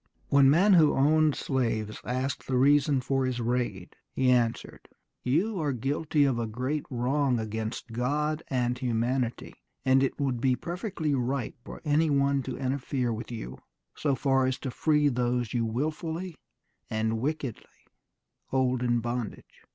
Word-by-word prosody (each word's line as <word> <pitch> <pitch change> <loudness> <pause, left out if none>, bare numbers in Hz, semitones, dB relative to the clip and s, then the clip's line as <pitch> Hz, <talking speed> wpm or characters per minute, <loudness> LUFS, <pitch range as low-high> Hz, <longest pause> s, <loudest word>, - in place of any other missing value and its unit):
When 140 -1 +6
men 190 +8 +5
who 160 -4 +5
owned 155 +2 +3
slaves 110 -5 -2
asked 130 +2 -3
the 130 - +1
reason 140 +1 +4
for 135 +1 0
his 130 -1 -1
raid, 120 -6 -2 0.2
he 130 -1 +2
answered, 120 -2 -1 0.3
"You 175 - 0
are 145 -3 0
guilty 145 +4 0
of 135 -4 +1
a 115 - -1
great 130 +7 -2
wrong 130 +1 +1
against 110 +2 -4
God 150 +6 -1
and 125 -2 0
humanity 120 0 -1 0.3
and 130 0 +5
it 135 - -1
would 130 -4 -1
be 130 0 +3
perfectly 175 - -3
right 130 -1 -1
for - - -9
any 155 +2 +3
one 140 -1 +2
to - - -4
interfere 130 -2 -1
with 115 +2 -6
you 65 - -7 0.3
so 140 -3 0
far 135 -1 +2
as 130 0 -1
to 130 - -3
free 150 +2 +2
those 125 -3 0
you 120 -2 +1
wilfully 160 +8 -3 0.6
and 110 0 -1
wickedly 140 -2 -5 0.6
hold 130 -1 +1
in 120 -1 +1
bondage.... 120 -1 -5
130 Hz, 150 wpm, -28 LUFS, 120-145 Hz, 0.6 s, When